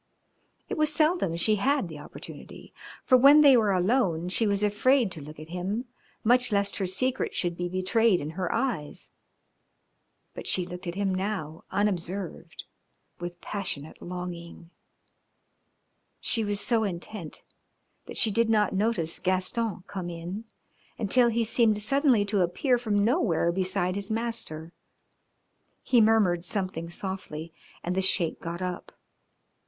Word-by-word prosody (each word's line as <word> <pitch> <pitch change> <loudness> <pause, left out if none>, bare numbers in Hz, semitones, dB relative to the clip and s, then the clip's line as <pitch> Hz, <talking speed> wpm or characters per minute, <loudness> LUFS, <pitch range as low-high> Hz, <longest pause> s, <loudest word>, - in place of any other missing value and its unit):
It - - -4
was 305 -1 +3
seldom 310 - +2
she 210 +5 +2
had 270 0 +1
the 155 -3 -9
opportunity, 145 - -11 0.3
for 255 - +6
when 285 +4 +8
they 280 -3 +8
were 215 -4 +3
alone 180 -3 +1
she 220 +4 +2
was 200 0 +1
afraid 220 +2 +3
to 165 -4 -7
look 150 +1 -10
at 155 +1 -10
him 190 +7 -3 0.4
much 245 +1 +4
lest 200 -1 +1
her 195 - -1
secret 255 +8 -1
should 175 -1 -1
be 175 +1 -3
betrayed 185 +2 +2
in 150 +2 -5
her 180 +1 -3
eyes. 225 - -3 1.2
But - - -7
she 180 - +2
looked 180 +1 -8
at 170 - -4
him 195 -1 0
now 185 -5 -4
unobserved, 185 -3 -3 0.6
with 175 0 -6
passionate 180 -7 -5
longing. 175 -1 -7 1.5
She 225 - +1
was 205 -1 -1
so 225 +1 +2
intent 180 -2 -5 0.6
that - - -8
she 220 - +3
did 230 +2 +2
not 210 -3 +2
notice 195 -5 0
Gaston 185 +2 0
come 185 -3 -5
in 175 +6 -6 0.5
until 235 +4 +3
he 230 0 +1
seemed 220 -1 +3
suddenly 255 -1 +3
to 205 -1 +1
appear 240 - +1
from 205 -4 +1
nowhere 215 - +2
beside 185 0 0
his 200 0 -4
master. 220 -8 -3 1.1
He 245 -3 +4
murmured 210 -6 +3
something 185 -3 -3
softly 170 -3 -6 0.3
and 175 - -1
the 190 - +2
Sheik 185 -3 +2
got 170 +2 -5
up. 180 -1 -5
195 Hz, 145 wpm, -27 LUFS, 175-225 Hz, 1.5 s, when